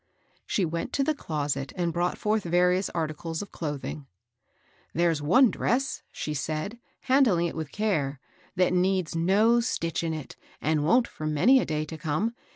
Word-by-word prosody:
She 195 Hz, -, +1 dB
went 165 Hz, +1 st, -4 dB
to 275 Hz, -, +2 dB
the 310 Hz, -, +1 dB
closet 145 Hz, -, -3 dB
and 175 Hz, -3 st, -1 dB
brought 175 Hz, +1 st, 0 dB
forth 215 Hz, +1 st, +1 dB
various 180 Hz, +2 st, +2 dB
articles 160 Hz, +1 st, -3 dB
of 200 Hz, -, -12 dB
clothing. 145 Hz, -2 st, -5 dB, 0.9 s
There's 165 Hz, -2 st, +2 dB
one 235 Hz, -, +5 dB
dress," 270 Hz, +3 st, -1 dB
she 150 Hz, -, -4 dB
said, 155 Hz, +10 st, -3 dB, 0.2 s
handling 250 Hz, -11 st, +3 dB
it 170 Hz, -, -3 dB
with 160 Hz, -3 st, -5 dB
care, 155 Hz, -11 st, -1 dB, 0.2 s
" 185 Hz, -, -31 dB
that 180 Hz, -1 st, +2 dB
needs 180 Hz, -2 st, +1 dB
no 205 Hz, +8 st, +4 dB
stitch 170 Hz, -8 st, -1 dB
in 160 Hz, -1 st, -1 dB
it, 150 Hz, -5 st, -8 dB, 0.2 s
and 155 Hz, -1 st, +1 dB
wont 235 Hz, +10 st, +4 dB
for 155 Hz, -, -6 dB
many 195 Hz, -, +5 dB
a -, -, 0 dB
day 155 Hz, 0 st, -2 dB
to 155 Hz, +1 st, -8 dB
come. 165 Hz, +10 st, -1 dB
170 Hz, 170 wpm, -27 LUFS, 155-205 Hz, 0.9 s, one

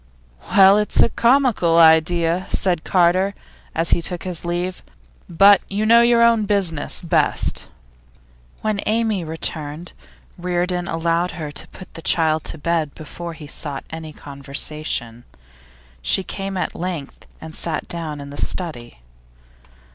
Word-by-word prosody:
'Well, 195 Hz, +1 st, +6 dB
it's 210 Hz, -, -1 dB
a -, -, +2 dB
comical 235 Hz, -10 st, +3 dB
idea,' 165 Hz, +2 st, +4 dB
said 180 Hz, -4 st, 0 dB
Carter, 185 Hz, +2 st, +2 dB, 0.4 s
as 165 Hz, +1 st, 0 dB
he -, -, +3 dB
took 175 Hz, +1 st, -4 dB
his 180 Hz, -3 st, -1 dB
leave, 175 Hz, +1 st, -3 dB, 0.5 s
'but 195 Hz, +3 st, +6 dB
you 205 Hz, +2 st, -1 dB
know 230 Hz, +2 st, +6 dB
your 235 Hz, 0 st, +4 dB
own 230 Hz, -2 st, +4 dB
business 185 Hz, -9 st, 0 dB
best.' 170 Hz, -, 0 dB, 0.9 s
When 215 Hz, -2 st, -1 dB
Amy 220 Hz, -4 st, 0 dB
returned, 160 Hz, 0 st, -4 dB, 0.5 s
Reardon 180 Hz, 0 st, -1 dB
allowed 170 Hz, +2 st, -1 dB
her 150 Hz, -3 st, -6 dB
to -, -, -8 dB
put 185 Hz, -, -13 dB
the 165 Hz, -, -9 dB
child 160 Hz, -2 st, +2 dB
to -, -, -6 dB
bed 160 Hz, -2 st, -1 dB
before 170 Hz, +2 st, -8 dB
he 155 Hz, -1 st, -11 dB
sought 145 Hz, -2 st, -5 dB
any 160 Hz, -1 st, -7 dB
conversation. 140 Hz, -4 st, -2 dB, 0.8 s
She 190 Hz, -, +2 dB
came 195 Hz, 0 st, -5 dB
at 180 Hz, -, -2 dB
length 170 Hz, -6 st, -6 dB
and 160 Hz, 0 st, -10 dB
sat 160 Hz, -1 st, -2 dB
down 160 Hz, -3 st, -4 dB
in 140 Hz, 0 st, -9 dB
the 145 Hz, -, -2 dB
study. 120 Hz, -, -4 dB
170 Hz, 140 wpm, -20 LUFS, 155-190 Hz, 0.9 s, Well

